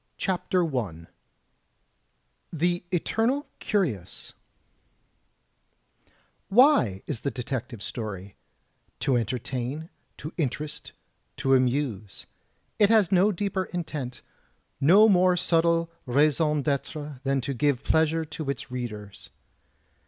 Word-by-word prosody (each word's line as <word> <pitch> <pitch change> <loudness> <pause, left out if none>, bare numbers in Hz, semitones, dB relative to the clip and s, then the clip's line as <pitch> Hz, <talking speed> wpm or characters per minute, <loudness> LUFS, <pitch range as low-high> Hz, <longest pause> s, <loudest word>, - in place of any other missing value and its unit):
CHAPTER 185 -1 0
I 85 -9 -3 1.5
THE 175 +2 0
ETERNAL 230 - 0
CURIOUS 135 - -2 2.2
Why 195 - +4
is 140 -7 -4
the 140 - -2
detective 125 -4 -5
story? 100 -4 -6 0.7
To 135 0 +2
entertain, 125 - -3 0.3
to 155 - -7
interest, 150 0 -3 0.4
to 135 - +2
amuse. 125 -6 0 0.5
It 205 -2 +5
has 215 -5 +4
no 195 +3 +4
deeper 195 0 -2
intent, 150 -8 -5 0.6
no 195 +10 +7
more 185 -3 +4
subtle 170 0 +2 0.2
raison 150 +3 +2
d'itre 145 0 -3
than 135 0 0
to 135 +3 -3
give 135 0 +1
pleasure 160 0 +2
to 155 -1 -6
its 140 -2 -4
readers. 105 -5 -7
145 Hz, 100 wpm, -26 LUFS, 125-175 Hz, 2.2 s, no